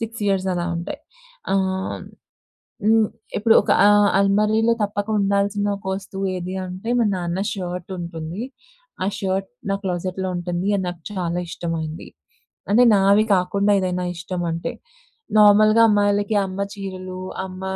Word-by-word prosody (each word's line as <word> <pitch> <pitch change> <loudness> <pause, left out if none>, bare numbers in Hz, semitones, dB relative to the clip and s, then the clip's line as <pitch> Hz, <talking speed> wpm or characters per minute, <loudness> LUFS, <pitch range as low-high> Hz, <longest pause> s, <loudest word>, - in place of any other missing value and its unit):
6 225 -1 -5
years 190 -1 0
అలా 175 0 -2
ఉంటాయి. 170 +2 -5 0.5
ఆహ్, 190 0 -1 0.8
హ్మ్, 220 -1 +4 0.3
ఇప్పుడు 225 +2 +4
ఒక - - -3 0.2
ఆహ్, 205 0 +5
అల్మరిలో 215 +3 +3
తప్పక 205 +1 -3
ఉండాల్సిన 200 +1 +1
ఒక 190 - -14
వస్తువు 195 0 -5
ఏది 180 +1 -5
అంటే, 185 +5 -7
మా 230 - +3
నాన్న 175 +1 -2
షర్ట్ 180 -1 -5
ఉంటుంది. 170 +3 -6 0.6
ఆ - - 0
షర్ట్ 195 0 -1 0.2
నా - - +2
క్లోజెట్‌లో 185 +1 -2
ఉంటుంది. 175 +1 -3
అది 190 - -1
నాకు 175 - -11
చాలా 175 -3 -2
ఇష్టమైంది. 165 -1 -4 0.7
అంటే 240 +4 +6
నావి 200 +2 +4
కాకుండా 200 +3 +1
ఏదైనా 180 -1 -1
ఇష్టం 175 +1 -5
అంటే. 165 +1 -3 0.7
నార్మల్‌గా 215 +2 +6
అమ్మాయిలకి 205 0 +2
అమ్మ 190 +1 -5
చీరలు, 185 -2 -7 0.3
అమ్మ 185 0 -9
190 Hz, 135 wpm, -22 LUFS, 180-205 Hz, 0.8 s, అంటే